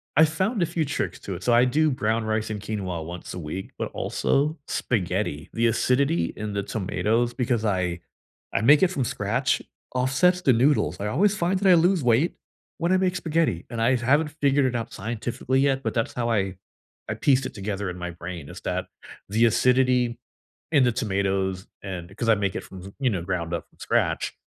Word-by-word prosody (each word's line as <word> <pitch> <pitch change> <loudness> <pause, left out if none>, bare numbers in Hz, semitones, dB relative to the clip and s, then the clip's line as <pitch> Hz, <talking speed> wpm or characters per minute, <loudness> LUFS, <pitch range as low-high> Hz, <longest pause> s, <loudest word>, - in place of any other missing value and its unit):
I 155 - +7
found 190 +8 -1
a 170 - +4
few 165 -1 -1
tricks 140 - -3
to 100 - -5
it, 90 - -8
so 120 - +3
I 120 +2 +6
do 155 +4 +2
brown 115 -3 0
rice 110 0 -1
and 105 -1 -3
quinoa 95 -6 -4
once 85 +1 -7
a 90 - -5
week, 85 +5 -6
but - - -3
also 150 +4 0
spaghetti; 90 - -1
the 115 0 +2
acidity 120 -7 +1
in 105 -1 -4
the 100 0 -1
tomatoes 110 +4 0
Because 120 -3 0
I 90 -3 0 0.5
I - - +1
make 145 +9 +6
it 190 - +7
from 140 -8 -1
scratch, 115 +6 0 0.3
offsets 140 +9 +3
the 130 - +4
noodles, 115 - +2
I 105 - -2
always 195 - +2
find 185 +2 +1
that 195 -1 +3
I - - +8
lose 175 -1 +3
weight 125 +8 +3 0.4
when 170 +2 0
I 185 - +5
make 185 -1 +1
spaghetti, 160 - 0
and 115 -1 -4
I 130 +3 +4
haven't 145 +6 +2
figured 140 -1 +3
it 125 - 0
out 115 -1 -4
scientifically 120 +5 -2
yet, 135 -1 +1
but - - -1
that's 115 -2 -1
how 120 -1 -1
I 95 -4 0 0.5
I - - -1
pieced 135 -2 +2
it - - -5
together 100 -1 -3
in 90 - -6
my 90 0 -5
brain 85 -2 -8
is - - -9
that, - - -2 0.4
the 115 +3 +3
acidity 125 0 +3 0.5
in 145 -4 +5
the 120 - +3
tomatoes, 95 -3 -1 0.2
and 95 -1 -7
'cause 115 0 -1
I 110 - +6
make 100 -2 -1
it - - -4
from 95 -1 -11
th 100 +1 -10
you 130 -3 +2
know, 95 -6 -1
ground 85 -2 -3
up 85 - -3
from - - -30
scratch, - - 0
115 Hz, 210 wpm, -25 LUFS, 95-140 Hz, 0.5 s, I